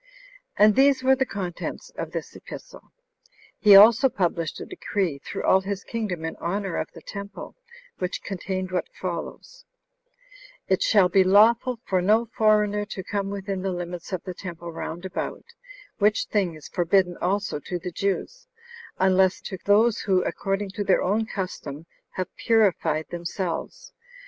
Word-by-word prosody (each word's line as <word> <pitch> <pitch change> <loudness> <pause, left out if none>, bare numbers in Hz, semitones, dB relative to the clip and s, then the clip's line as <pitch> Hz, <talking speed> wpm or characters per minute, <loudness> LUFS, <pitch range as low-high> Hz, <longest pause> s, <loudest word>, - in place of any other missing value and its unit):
4. 210 - +7
And 215 - +5
these 270 0 +4
were 265 +1 +5
the 265 0 0
contents 200 - -5
of - - -6
this - - -6
epistle. - - -11 0.7
He 205 -2 +8
also 230 +6 +8
published 170 - -1
a - - -6
decree 180 -9 -2
through - - -6
all 190 - +4
his 195 0 -4
kingdom 200 -8 -4
in 160 - -4
honor 195 +1 -3
of - - -2
the - - -12
temple, 200 0 -8 0.4
which 180 0 -3
contained 185 -1 -4
what 180 -2 -2
follows: 185 - -6 1.0
"It 190 - +1
shall 200 -4 +5
be 190 +2 +4
lawful 225 +5 +4
for 185 -2 +1
no 215 +5 +3
foreigner 210 -1 +3
to 195 -2 -6
come 200 +1 -2
within 195 -1 -4
the 190 0 -1
limits 175 0 -6
of 185 -3 -3
the 185 - -6
temple 170 -2 -8
round 165 +2 -6
about; 190 - -5 0.5
which 210 +1 +3
thing 190 -6 0
is 155 - -11
forbidden 180 0 +2
also 195 -3 -1
to 180 +4 -4
the 180 +1 -6
Jews, 200 - -3 0.5
unless 190 0 +3
to 190 - -7
those 215 +3 +4
who, 185 -3 +1
according 195 0 -2
to 205 +1 -3
their 195 - +2
own 215 +4 0
custom, 165 -7 -5 0.3
have 185 - -4
purified 180 -8 +2
themselves. 175 - -5
195 Hz, 160 wpm, -25 LUFS, 180-210 Hz, 1.0 s, He